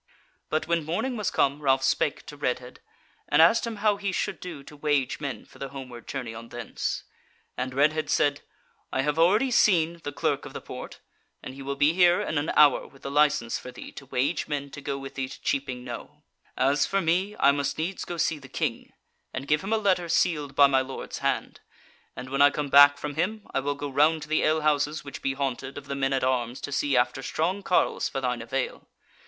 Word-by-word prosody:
But 155 - 0
when 170 -1 +1
morning 180 - -2
was 210 -4 -1
come 140 +2 +1
Ralph 135 -2 +2
spake 140 +2 0
to 150 - -9
Redhead 125 -3 -3 0.5
and 150 - +3
asked 225 +9 +5
him 230 - -4
how 205 -1 +4
he 200 -1 -2
should - - -2
do 165 -6 -8
to 150 - -13
wage 145 -2 0
men 140 -3 -5
for - - -18
the 135 - -5
homeward 125 -3 -9
journey 125 -5 -4
on 115 +1 -9
thence; 120 -2 -4 0.5
and 130 0 -4
Redhead 155 +3 +2
said: 145 0 +2 0.5
"I 130 - 0
have 150 +2 0
already 210 +10 +4
seen 170 -7 +3
the 145 - -4
Clerk - - -1
of - - -9
the - - -5
Porte, - - -9 0.4
and - - -7
he 135 - -10
will 140 +1 -3
be 145 +3 +3
here 175 0 +5
in 155 - -1
an 145 - -2
hour 145 -3 +5
with 135 - -20
the 140 - -4
license 145 -5 +2
for - - -9
thee - - -10
to 140 - -11
wage 140 +6 0
men 140 -2 -3
to 145 - -8
go 140 -1 -3
with 135 0 -8
thee 130 -1 -3
to - - -10
Cheaping 130 -3 -2
Knowe. 120 -2 -9 0.3
As 140 +2 +2
for 195 - +1
me, 185 +4 0
I 140 - +6
must 140 -1 -1
needs 175 +5 -3
go 175 - -5
see 160 -1 0
the - - -13
King, - - -3 0.4
and 135 - -6
give 150 +1 +2
him 195 - -4
a 225 - +3
letter 185 -5 +1
sealed 150 -5 +1
by 140 - +8
my 135 -1 +3
lord's 130 0 -6
hand; - - -2 0.6
and 130 +1 -8
when 140 +1 +1
I 145 - +8
come 145 0 -3
back 145 +1 +8
from 150 -1 -5
him, 210 +8 -2
I - - +2
will 145 +1 -2
go 145 +1 -5
round 150 +3 +2
to - - -9
the 155 - +2
alehouses 150 -1 +1
which 140 - -8
be 135 - 0
haunted 135 0 -3
of 145 - -8
the 140 - -4
men 135 -1 0
at 135 -1 0
arms 125 -1 0
to 145 - -5
see 140 -1 +1
after 125 +2 +1
strong 175 +8 -1
carles 185 - +1
for - - -3
thine 125 -2 -2
avail. 130 +3 -3
145 Hz, 225 wpm, -26 LUFS, 135-160 Hz, 0.6 s, by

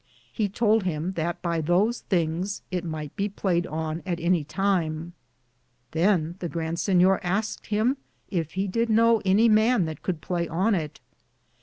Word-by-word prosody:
He 210 -3 0
Tould 220 +2 +2
him 175 -1 -2
that 170 -1 -3
by 170 -2 0
those 190 +9 +2
thinges 175 +2 -1
it 180 -2 -2
myghte 155 -3 -5
be 200 +1 -1
played 180 -3 0
on 160 +1 -3
at 175 -2 -3
any 170 -1 +2
time. 170 -2 -1 0.8
Than 170 0 +1
the 175 - -3
Grande 165 0 -3
Sinyor 185 +1 +4
asked 195 +4 -2
him 220 +6 +1 0.3
yf 165 -5 -1
he 190 +1 -1
did 230 +5 0
know 225 0 +4
any 200 +5 +5
man 220 -2 +4
that 155 -2 -6
could 175 -4 -2
playe 170 0 -2
on 190 +7 +1
it. 155 -6 -3
180 Hz, 165 wpm, -26 LUFS, 165-205 Hz, 0.8 s, any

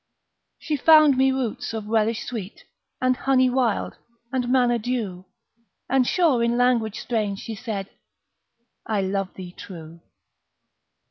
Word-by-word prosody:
She 305 -2 -3
found 310 -1 +6
me 265 +1 +3
roots 250 -3 -3
of 220 -2 -5
relish 220 +1 0
sweet, 220 -5 -7 0.4
And 255 0 +2
honey 260 -1 +2
wild, 245 -4 0 0.4
and 250 -2 -1
manna 245 -2 +3
dew, 210 -6 -3 0.6
And 260 -1 +2
sure 310 -10 +2
in 235 0 +1
language 240 -4 +1
strange 210 -4 -2
she 225 - -6
said, 205 -3 -5 1.0
"I 215 -3 -1
love 195 0 -2
thee 180 -2 -8
true!" 165 -3 -11
235 Hz, 130 wpm, -24 LUFS, 205-255 Hz, 1.0 s, found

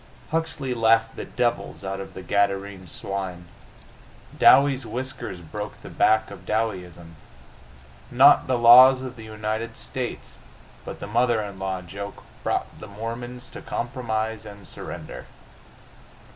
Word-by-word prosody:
Huxley 160 -5 -1
laughed 115 -1 +3
the - - -6
devils 120 -6 -2
out 95 0 -4
of 95 -1 -9
the 95 - -7
Gadarene 100 0 -1
swine. 90 0 -5 0.9
Dowie's 135 0 +6
whiskers 120 -5 -5
broke 105 +6 -7
the - - -9
back 110 0 +3
of 95 -2 -10
Dowieism. 90 -6 -3 0.9
Not 135 +4 +6
the 130 -1 +2
laws 130 +2 +8
of 130 -1 -6
the 115 -2 -10
United 110 +1 -4
States - - -6 0.5
but - - -8
the - - -4
mother 120 +2 +2
in 100 -2 -6
law 95 -1 -3
joke 100 +3 -8 0.2
brought - - -2
the 110 - -9
Mormons 115 +4 -7
to - - -9
compromise 110 -3 -3
and 100 -3 -11
surrender. - - -8
110 Hz, 130 wpm, -24 LUFS, 100-120 Hz, 0.9 s, laws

